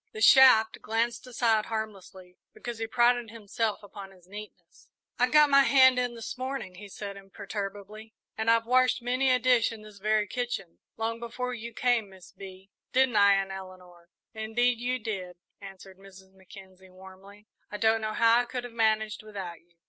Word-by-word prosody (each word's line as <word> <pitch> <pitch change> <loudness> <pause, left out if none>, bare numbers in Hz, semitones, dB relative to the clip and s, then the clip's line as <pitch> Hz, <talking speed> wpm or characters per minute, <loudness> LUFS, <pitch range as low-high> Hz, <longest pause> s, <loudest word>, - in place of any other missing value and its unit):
The 220 - -7
shaft 225 -2 +6
glanced 230 +3 -2
aside 230 -3 +1
harmlessly, 195 -4 -7 0.2
because 240 -2 -7
he 225 - -3
prided 240 0 +2
himself 220 -1 -3
upon 200 -1 -10
his 185 -2 -20
neatness. 210 +2 -13 0.3
"I 250 +1 +3
got 300 0 +5
my 275 0 +7
hand 260 -2 +5
in 245 -1 -2
this 230 +2 -7
morning," 260 -7 -5
he 200 +3 -12
said 200 0 -8
imperturbably, 205 +2 -8 0.2
"and 220 +1 -1
I've 230 0 +3
washed 255 0 +2
many 255 +2 +1
a 255 - +4
dish 250 -2 +2
in 220 -2 -10
this 210 -1 -14
very 215 +1 +1
kitchen, 205 -6 -5 0.2
long 230 +1 -3
before 250 +2 -5
you 235 0 -7
came, 240 -4 0
Miss 190 -2 -16
Bee; 190 0 -13 0.2
didn't 260 -2 +2
I, 200 -1 +6
Aunt 195 0 -2
Eleanor?" 180 -2 -11 0.2
"Indeed 230 +2 0
you 250 +1 -1
did," 195 -6 -6 0.3
answered 195 -1 -12
Mrs. 190 -1 -16
Mackenzie, 190 0 -16
warmly. 190 +2 -15 0.2
"I 210 - -6
don't 220 +1 +2
know 215 0 -3
how 230 +1 +4
I 245 - 0
could 245 0 -5
have 245 -1 -9
managed 220 -2 0
without 195 -5 -8
you." 170 0 -35
220 Hz, 180 wpm, -28 LUFS, 195-240 Hz, 0.3 s, my